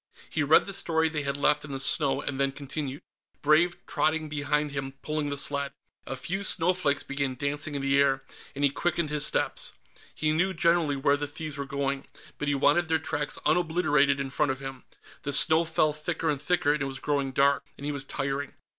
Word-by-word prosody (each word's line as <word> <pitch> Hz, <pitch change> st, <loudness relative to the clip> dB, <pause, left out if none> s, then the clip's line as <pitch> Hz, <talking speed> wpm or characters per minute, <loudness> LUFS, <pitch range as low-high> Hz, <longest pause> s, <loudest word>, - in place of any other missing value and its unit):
He 160 Hz, -, 0 dB
read 145 Hz, +2 st, +5 dB
the 200 Hz, -, -6 dB
story 160 Hz, -3 st, +1 dB
they 155 Hz, -1 st, -2 dB
had 140 Hz, 0 st, -2 dB
left 150 Hz, +1 st, +2 dB
in 150 Hz, -, -8 dB
the 135 Hz, -, -3 dB
snow, 135 Hz, 0 st, +2 dB
and 140 Hz, -1 st, -3 dB
then 140 Hz, 0 st, +1 dB
continued, 140 Hz, 0 st, -5 dB, 0.4 s
Brave 160 Hz, +4 st, +4 dB
trotting 155 Hz, 0 st, 0 dB
behind 150 Hz, 0 st, 0 dB
him 135 Hz, -1 st, -4 dB
pulling 150 Hz, -1 st, -2 dB
the 140 Hz, -, -3 dB
sled. 140 Hz, 0 st, -1 dB, 0.3 s
A 135 Hz, -, -3 dB
few 190 Hz, +9 st, -3 dB
snowflakes 175 Hz, -5 st, +3 dB
began 140 Hz, -2 st, -2 dB
dancing 145 Hz, +2 st, -2 dB
in 140 Hz, -, -3 dB
the 140 Hz, 0 st, +3 dB
air, 135 Hz, -1 st, +2 dB, 0.3 s
and 140 Hz, -, -3 dB
he 140 Hz, -, +4 dB
quickened 170 Hz, 0 st, -1 dB
his 150 Hz, -1 st, +4 dB
steps. -, -, -1 dB, 0.4 s
He 155 Hz, 0 st, 0 dB
knew, 180 Hz, +4 st, +1 dB
generally, 170 Hz, -3 st, +3 dB
where 140 Hz, +1 st, +2 dB
the 145 Hz, 0 st, -3 dB
thieves 155 Hz, 0 st, -6 dB
were 140 Hz, -1 st, -4 dB
going, 140 Hz, 0 st, -2 dB, 0.3 s
but 150 Hz, -, -2 dB
he 145 Hz, -, +2 dB
wanted 150 Hz, +4 st, +3 dB
their 160 Hz, -, +3 dB
tracks 150 Hz, -2 st, -2 dB
unobliterated 155 Hz, -4 st, +2 dB
in 135 Hz, -1 st, -3 dB
front 135 Hz, +2 st, +1 dB
of 130 Hz, -, -5 dB
him. 135 Hz, -1 st, -8 dB, 0.4 s
The 145 Hz, -, -3 dB
snow 160 Hz, +3 st, +5 dB
fell 155 Hz, -2 st, +2 dB
thicker 160 Hz, +1 st, -2 dB
and 140 Hz, -2 st, -3 dB
thicker, 150 Hz, -3 st, +2 dB
and 150 Hz, -, -2 dB
it 135 Hz, -, 0 dB
was 135 Hz, 0 st, -5 dB
growing 140 Hz, -1 st, -1 dB
dark, 140 Hz, +1 st, +2 dB
and 140 Hz, -, -8 dB
he 150 Hz, -, -1 dB
was 140 Hz, -2 st, -3 dB
tiring. 140 Hz, 0 st, -3 dB
145 Hz, 210 wpm, -27 LUFS, 140-155 Hz, 0.4 s, read